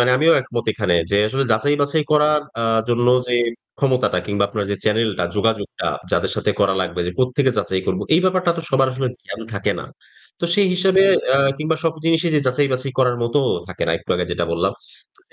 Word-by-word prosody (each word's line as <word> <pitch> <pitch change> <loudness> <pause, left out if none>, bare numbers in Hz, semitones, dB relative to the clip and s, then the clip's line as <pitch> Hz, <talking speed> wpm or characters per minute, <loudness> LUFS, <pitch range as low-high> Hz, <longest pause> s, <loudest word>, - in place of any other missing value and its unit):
মানে 120 +1 +4
আমিও 165 +4 +4
একমত 120 -2 -4
এখানে 90 - 0 0.2
যে 100 - +2
আসলে 135 +3 -1
যাচাই 145 +7 +1
বাছাই 145 +2 +1
করার 150 0 +3 0.2
আ - - -1 0.3
জন্য 120 0 +1 0.2
যে 125 - 0 0.4
ক্ষমতাটা 130 -8 +1
কিংবা 100 -1 0
আপনার 105 0 -3
যে 100 - -1
চ্যানেলটা 105 -4 +1
যোগাযোগটা 105 -1 -1 0.3
যাদের - - +1
সাথে - - 0
করা 95 -1 +3
লাগবে। 90 -1 -3
যে 90 - -3
কোত্থেকে 130 +1 +2
যাচাই 95 0 -1
করব 95 - -1
এই 170 - +4
ব্যাপারটা 185 -1 +2
তো - - -3
সবার 135 0 +3
আসলে 130 0 -2 0.2
জ্ঞান - - -7
থাকে 100 - -1
না। - - -8 0.6
তো - - -1
সেই 200 0 +3
হিসেবে 190 +1 +3 0.3
আ - - +5 0.2
কিংবা 155 +1 -1
সব 165 - +2
জিনিসই 165 +1 +2
যে 150 - +3
যাচাই 140 +3 +2
বাছাই 130 +1 -3
করার 125 -2 +3
মতোও 125 +3 +1 0.2
থাকে 95 - -6
না 80 - +1
একটু - - -11
আগে 90 0 -1
যেটা 85 0 -1
বললাম। 85 - 0 0.4
তো - - -36
130 Hz, 205 wpm, -20 LUFS, 105-150 Hz, 0.6 s, আ